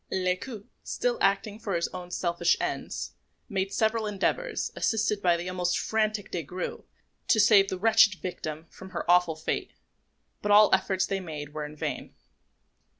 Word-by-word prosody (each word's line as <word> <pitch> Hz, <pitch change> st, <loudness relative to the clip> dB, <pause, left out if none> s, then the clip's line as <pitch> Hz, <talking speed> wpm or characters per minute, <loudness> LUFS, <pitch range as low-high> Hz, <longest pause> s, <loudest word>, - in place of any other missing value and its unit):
Lescaut, 190 Hz, +4 st, -2 dB, 0.2 s
still 245 Hz, -1 st, -1 dB
acting 200 Hz, +2 st, +1 dB
for 200 Hz, -5 st, -3 dB
his 170 Hz, -, 0 dB
own 180 Hz, -1 st, -8 dB
selfish 170 Hz, -1 st, +1 dB
ends, -, -, -3 dB, 0.4 s
made 195 Hz, -3 st, -2 dB
several 220 Hz, -1 st, +1 dB
endeavours, 210 Hz, -, -1 dB
assisted 215 Hz, -2 st, 0 dB
by 175 Hz, -2 st, +3 dB
the 175 Hz, +1 st, -5 dB
almost 180 Hz, -1 st, 0 dB
frantic 215 Hz, -1 st, -1 dB
Des 175 Hz, -, -2 dB
Grieux, 180 Hz, +5 st, -6 dB, 0.4 s
to 220 Hz, -, +4 dB
save 205 Hz, -2 st, +6 dB
the 185 Hz, -, -3 dB
wretched 220 Hz, 0 st, +5 dB
victim 160 Hz, -4 st, -6 dB
from 190 Hz, -, -11 dB
her -, -, -4 dB
awful 175 Hz, -2 st, +4 dB
fate; 160 Hz, -, -3 dB, 0.7 s
but 205 Hz, -, 0 dB
all 210 Hz, +1 st, +8 dB
the -, -, +8 dB
efforts 190 Hz, 0 st, -1 dB
they 195 Hz, -, -2 dB
made 150 Hz, -5 st, -7 dB
were 150 Hz, -1 st, -4 dB
in 150 Hz, -, -12 dB
vain. -, -, -5 dB
190 Hz, 165 wpm, -28 LUFS, 175-215 Hz, 0.7 s, all